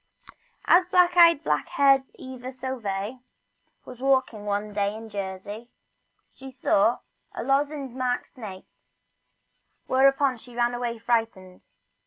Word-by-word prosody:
AS 360 Hz, +1 st, +5 dB
black 360 Hz, -1 st, +3 dB
eyed, 335 Hz, -4 st, +6 dB
black 150 Hz, -1 st, 0 dB
haired 275 Hz, -1 st, +4 dB
Eva 255 Hz, 0 st, -8 dB
Sauvet 245 Hz, -4 st, -4 dB, 0.7 s
was 250 Hz, -1 st, -11 dB
walking 260 Hz, -5 st, +1 dB
one 205 Hz, +1 st, -2 dB
day 205 Hz, 0 st, -1 dB
in 225 Hz, 0 st, -9 dB
Jersey 205 Hz, +3 st, -6 dB, 0.6 s
she 265 Hz, 0 st, -11 dB
saw 240 Hz, -3 st, +2 dB, 0.4 s
a -, -, -4 dB
lozenge 280 Hz, -1 st, -1 dB
marked 250 Hz, -1 st, -2 dB
snake, 205 Hz, -7 st, -10 dB, 1.2 s
whereupon 270 Hz, 0 st, +3 dB
she 245 Hz, +1 st, -15 dB
ran 240 Hz, 0 st, +1 dB
away 240 Hz, -1 st, -3 dB
frightened. 225 Hz, -5 st, -2 dB
245 Hz, 120 wpm, -25 LUFS, 210-270 Hz, 1.2 s, eyed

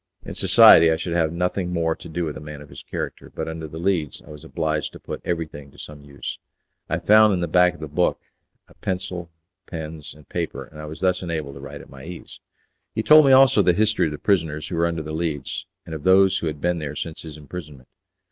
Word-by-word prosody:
In -, -, -6 dB
society 80 Hz, 0 st, +7 dB
I 80 Hz, -, +3 dB
should 85 Hz, +1 st, -4 dB
have 80 Hz, -2 st, +2 dB
had 85 Hz, -, -7 dB
nothing 90 Hz, 0 st, -1 dB
more 80 Hz, -2 st, 0 dB
to 85 Hz, -, -11 dB
do 85 Hz, +2 st, -2 dB
with 75 Hz, -, -4 dB
a -, -, -7 dB
man 75 Hz, -1 st, -8 dB
of 75 Hz, 0 st, -13 dB
his -, -, -10 dB
character, -, -, -6 dB
but 80 Hz, -, -3 dB
under 80 Hz, -1 st, -5 dB
the 80 Hz, +1 st, -9 dB
Leads 85 Hz, -5 st, -1 dB
I 75 Hz, -, -13 dB
was 75 Hz, 0 st, -11 dB
obliged 80 Hz, -2 st, -2 dB
to -, -, -11 dB
put -, -, -7 dB
everything 80 Hz, -4 st, -4 dB
to -, -, -20 dB
some 75 Hz, -1 st, -10 dB
use. 70 Hz, -1 st, -7 dB, 0.5 s
I 85 Hz, -, 0 dB
found 105 Hz, +3 st, +5 dB
in -, -, -2 dB
the 85 Hz, -, -1 dB
back 90 Hz, +2 st, +4 dB
of -, -, -15 dB
the 75 Hz, -, -5 dB
book 85 Hz, +5 st, 0 dB, 0.5 s
a -, -, -20 dB
pencil, 90 Hz, -2 st, -4 dB, 0.4 s
pens, 80 Hz, -3 st, -7 dB
and 75 Hz, -1 st, -18 dB
paper, 85 Hz, -2 st, -4 dB
and 75 Hz, 0 st, -12 dB
I -, -, -7 dB
was 75 Hz, +1 st, -9 dB
thus 90 Hz, -1 st, +1 dB
enabled 80 Hz, -5 st, -4 dB
to 70 Hz, -, -10 dB
write 70 Hz, -, -9 dB
at -, -, -15 dB
my 65 Hz, -1 st, -12 dB
ease. 85 Hz, +2 st, -10 dB, 0.6 s
He 110 Hz, -, -1 dB
told 155 Hz, +1 st, +7 dB
me -, -, +6 dB
also 130 Hz, -5 st, +7 dB
the 90 Hz, -2 st, +4 dB
history 110 Hz, -1 st, +2 dB
of -, -, -4 dB
the 75 Hz, -, -5 dB
prisoners 80 Hz, -6 st, 0 dB
who 90 Hz, -, -3 dB
were 85 Hz, +1 st, +2 dB
under 85 Hz, -2 st, -3 dB
the 80 Hz, -, -6 dB
Leads, 80 Hz, -4 st, -3 dB, 0.2 s
and 80 Hz, -, -8 dB
of 80 Hz, -, -5 dB
those 95 Hz, +3 st, +5 dB
who 85 Hz, -, -3 dB
had 75 Hz, -1 st, -4 dB
been 90 Hz, +2 st, 0 dB
there 75 Hz, -3 st, -5 dB
since 80 Hz, -1 st, -5 dB
his 80 Hz, -2 st, -9 dB
imprisonment. 75 Hz, -3 st, -10 dB
80 Hz, 250 wpm, -23 LUFS, 75-90 Hz, 0.6 s, society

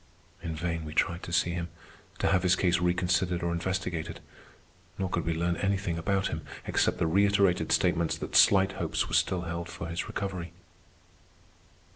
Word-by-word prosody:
In 80 Hz, -2 st, -4 dB
vain 85 Hz, 0 st, -2 dB
we 75 Hz, 0 st, -7 dB
tried 85 Hz, -1 st, +1 dB
to -, -, -8 dB
see 85 Hz, 0 st, +2 dB
him, 85 Hz, -1 st, -3 dB, 0.5 s
to -, -, +1 dB
have 90 Hz, -2 st, +3 dB
his 90 Hz, -1 st, +3 dB
case 90 Hz, -1 st, +2 dB
reconsidered 90 Hz, 0 st, +1 dB
or 85 Hz, -, 0 dB
investigated. 85 Hz, -1 st, -3 dB, 0.8 s
Nor 95 Hz, -1 st, -2 dB
could 85 Hz, -, -1 dB
we 85 Hz, -, 0 dB
learn 85 Hz, +1 st, 0 dB
anything 95 Hz, -4 st, -1 dB
about 95 Hz, +3 st, 0 dB
him -, -, -4 dB, 0.2 s
except -, -, +1 dB
the -, -, +1 dB
reiterated 100 Hz, +1 st, +3 dB
statements 85 Hz, -3 st, +2 dB
that -, -, -6 dB
slight 95 Hz, -1 st, +6 dB
hopes -, -, -1 dB
were -, -, -8 dB
still 90 Hz, -2 st, +2 dB
held 85 Hz, 0 st, -5 dB
for 85 Hz, -, -6 dB
his 85 Hz, +1 st, -3 dB
recovery. 90 Hz, -4 st, -4 dB
90 Hz, 170 wpm, -29 LUFS, 85-95 Hz, 0.8 s, slight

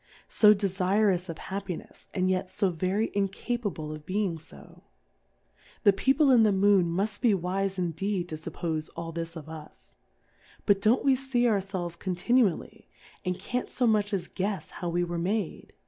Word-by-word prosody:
So 210 Hz, -1 st, +6 dB
de 200 Hz, 0 st, -2 dB
fu'ous 190 Hz, 0 st, +1 dB
of 165 Hz, -, -5 dB
Happinefs, 190 Hz, -1 st, -7 dB
and 185 Hz, -1 st, 0 dB
yet 185 Hz, 0 st, 0 dB
fo 195 Hz, 0 st, +1 dB
very 185 Hz, +6 st, 0 dB
in 200 Hz, -1 st, 0 dB
capable 200 Hz, -7 st, -4 dB
of 155 Hz, -1 st, -8 dB
being 190 Hz, 0 st, -1 dB
fo? 70 Hz, -, -15 dB, 1.0 s
The 200 Hz, -, +6 dB
People 270 Hz, +6 st, +3 dB
in 245 Hz, -3 st, +6 dB
the 215 Hz, -1 st, +5 dB
Moon 195 Hz, -2 st, +4 dB
mufl: 200 Hz, +5 st, -2 dB
be 230 Hz, -5 st, +4 dB
wife 190 Hz, +2 st, -2 dB
indeed 180 Hz, +2 st, -1 dB
to 155 Hz, -, -4 dB
fuppofe 160 Hz, 0 st, -4 dB
all 165 Hz, 0 st, -5 dB
this 165 Hz, 0 st, -5 dB
of 155 Hz, -2 st, -8 dB
us. 155 Hz, -, -11 dB, 0.7 s
But 200 Hz, -1 st, +3 dB
don't 225 Hz, +6 st, +3 dB
we 270 Hz, -1 st, +5 dB
fee 255 Hz, -2 st, 0 dB
our 215 Hz, -4 st, +3 dB
felves 185 Hz, -3 st, -4 dB
continually, 190 Hz, +2 st, 0 dB, 0.4 s
and 180 Hz, 0 st, -2 dB
can't 250 Hz, 0 st, -3 dB
fo 250 Hz, -, 0 dB
much 210 Hz, -2 st, +2 dB
as 185 Hz, -4 st, -2 dB
guefs 190 Hz, -3 st, -3 dB
how 175 Hz, -, -4 dB
we 175 Hz, +1 st, 0 dB
were 175 Hz, -1 st, -3 dB
made 195 Hz, +1 st, -2 dB
190 Hz, 175 wpm, -28 LUFS, 175-210 Hz, 1.0 s, So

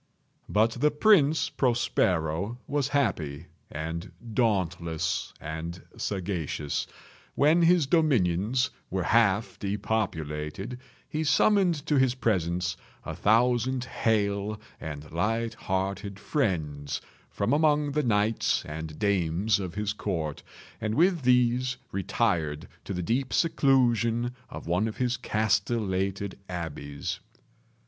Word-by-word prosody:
But 110 Hz, +2 st, +3 dB
the 130 Hz, +6 st, +2 dB
Prince 155 Hz, -1 st, +4 dB
Prospero 100 Hz, -, +1 dB
was 145 Hz, -2 st, 0 dB
happy 95 Hz, -, -1 dB, 0.2 s
and 80 Hz, +4 st, -5 dB, 0.2 s
dauntless 90 Hz, -7 st, 0 dB
and 80 Hz, +3 st, -5 dB, 0.2 s
sagacious. 85 Hz, -7 st, -2 dB, 0.5 s
When 155 Hz, +4 st, +4 dB
his 170 Hz, -2 st, +5 dB
dominions 125 Hz, -, +2 dB, 0.2 s
were 95 Hz, 0 st, -1 dB
half 105 Hz, -1 st, +2 dB
depopulated, 100 Hz, -, -3 dB, 0.3 s
he 155 Hz, 0 st, -2 dB
summoned 175 Hz, -1 st, +3 dB
to 150 Hz, -3 st, +2 dB
his 130 Hz, -2 st, +3 dB
presence 90 Hz, -7 st, 0 dB, 0.3 s
a -, -, -4 dB
thousand 120 Hz, +3 st, +2 dB
hale 105 Hz, -3 st, 0 dB, 0.2 s
and 75 Hz, -1 st, -7 dB
light 115 Hz, +7 st, 0 dB
hearted 95 Hz, 0 st, -3 dB
friends 80 Hz, -, -1 dB, 0.3 s
from 100 Hz, +6 st, 0 dB
among 150 Hz, -1 st, +3 dB
the 150 Hz, +2 st, +1 dB
knights 110 Hz, -3 st, +1 dB
and 80 Hz, 0 st, -6 dB
dames 100 Hz, +1 st, +1 dB
of 95 Hz, -3 st, -5 dB
his 105 Hz, 0 st, -1 dB
court, 80 Hz, -8 st, -3 dB, 0.4 s
and 110 Hz, +1 st, -1 dB
with 175 Hz, +1 st, +3 dB
these 125 Hz, 0 st, +3 dB
retired 90 Hz, -5 st, 0 dB, 0.2 s
to 100 Hz, -, -4 dB
the 90 Hz, -, -2 dB
deep 125 Hz, +6 st, 0 dB
seclusion 120 Hz, -5 st, +2 dB, 0.2 s
of -, -, -8 dB
one 90 Hz, +6 st, +1 dB
of 110 Hz, -, -6 dB
his 125 Hz, -1 st, +1 dB
castellated 105 Hz, -4 st, 0 dB
abbeys. 75 Hz, -5 st, -4 dB
105 Hz, 110 wpm, -28 LUFS, 90-125 Hz, 0.5 s, his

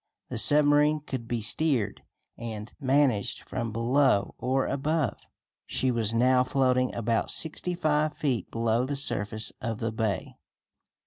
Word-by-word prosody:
The -, -, -3 dB
submarine 150 Hz, +1 st, +4 dB
could 130 Hz, -5 st, -6 dB
be 120 Hz, -1 st, -2 dB
steered 125 Hz, -1 st, 0 dB, 0.3 s
and 110 Hz, -2 st, -7 dB
managed 130 Hz, -6 st, +1 dB
from 120 Hz, -3 st, -3 dB
below 120 Hz, 0 st, +2 dB
or 130 Hz, +2 st, 0 dB
above. 145 Hz, -2 st, -1 dB, 0.5 s
She 130 Hz, 0 st, 0 dB
was 115 Hz, -3 st, 0 dB
now 125 Hz, +2 st, +3 dB
floating 130 Hz, -1 st, +1 dB
about 115 Hz, 0 st, 0 dB
sixty 175 Hz, +2 st, 0 dB
five 155 Hz, -2 st, 0 dB
feet 130 Hz, -6 st, -1 dB
below 115 Hz, +1 st, 0 dB
the 140 Hz, -, -2 dB
surface 110 Hz, -5 st, -1 dB
of 115 Hz, -1 st, -3 dB
the 115 Hz, +1 st, -2 dB
bay. 110 Hz, -3 st, -3 dB
125 Hz, 135 wpm, -27 LUFS, 115-145 Hz, 0.5 s, submarine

